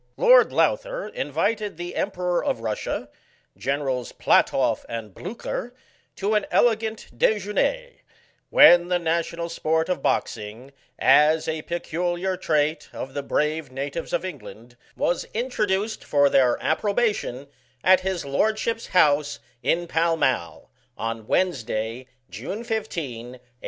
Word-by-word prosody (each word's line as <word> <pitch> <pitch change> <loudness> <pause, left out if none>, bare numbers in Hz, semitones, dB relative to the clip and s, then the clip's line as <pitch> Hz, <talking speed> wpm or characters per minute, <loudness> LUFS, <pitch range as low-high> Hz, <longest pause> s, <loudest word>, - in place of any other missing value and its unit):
Lord - - +6
Lowther - - 0
invited 215 - -2
the 175 0 -6
Emperor 180 -3 -1
of - - -1
Russia, 110 -2 -3 0.5
Generals 135 -2 -2
Platoff - - +2
and 115 -4 -6
Blucher, 235 - -6 0.4
to 200 +2 -1
an 210 -2 +1
elegant 220 - +1
dejuene^ 215 - 0 0.5
when 175 - +7
the 180 0 +2
national 170 0 -1
sport 160 0 -1
of 180 -6 -1
Boxing, 115 +4 -2 0.3
as 150 +4 +4
a 160 -1 -2
peculiar 175 +2 -2
trait 155 -2 0
of 135 - -7
the 140 - -2
brave 150 0 -1
natives* 140 +5 -5
of 175 - 0
England^ 120 - -9 0.2
was 175 - 0
introduced 215 -3 -1
for 145 -1 +3
their 125 -3 +4
approbation, 200 - 0 0.4
at 185 0 +6
his 185 -3 -3
lordship's 220 +10 0
house, 145 -4 +3 0.2
in 175 +1 +1
Pall 165 0 +1
Mall, 85 - -1 0.3
on 115 0 -4
Wednesday, 120 -7 -1 0.2
June 125 - -6
15, 165 - -4
1814. 130 - -13
170 Hz, 120 wpm, -24 LUFS, 135-205 Hz, 0.5 s, when